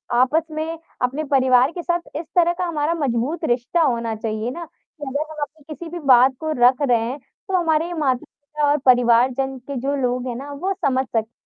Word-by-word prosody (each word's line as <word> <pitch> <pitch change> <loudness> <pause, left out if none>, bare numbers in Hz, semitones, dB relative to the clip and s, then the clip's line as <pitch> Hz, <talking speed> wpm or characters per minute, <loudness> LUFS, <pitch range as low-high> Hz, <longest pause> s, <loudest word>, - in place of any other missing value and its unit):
आपस 260 +6 +3
में 320 +2 -4 0.2
अपने 265 +5 -1
परिवार 260 +1 +4
के 350 - -6
साथ 345 0 0 0.2
इस 325 - -4
तरह 345 -1 +4
का 365 - -1
हमारा 320 -1 -1
मज़बूत 280 +2 -1
रिश्ता 245 +8 +1
होना 235 -6 0
चाहिए 220 +1 -3
ना, 340 - -6
कि 305 -1 -18
अगर 300 +3 -3
हम 305 - -8
अपनी 305 +1 -7
किसी 335 +1 -8
भी 350 - -5
बात 255 +1 +6
को 315 -1 -3
रख 250 +2 +6
रहे 235 -2 +4
हैं, 240 +5 -3
तो 370 +7 -5
हमारे 330 0 +1
माता-पिता 290 0 -2
और 295 - +3
परिवार 245 0 +5
जन 270 0 -2
के 280 - -5
जो 280 +3 -1
लोग 250 0 -1
हैं 240 - -3
ना 280 +4 -7
वो 370 +8 -2
समझ 260 -1 +1
सकें 225 -1 -2
280 Hz, 210 wpm, -21 LUFS, 250-315 Hz, 0.2 s, बात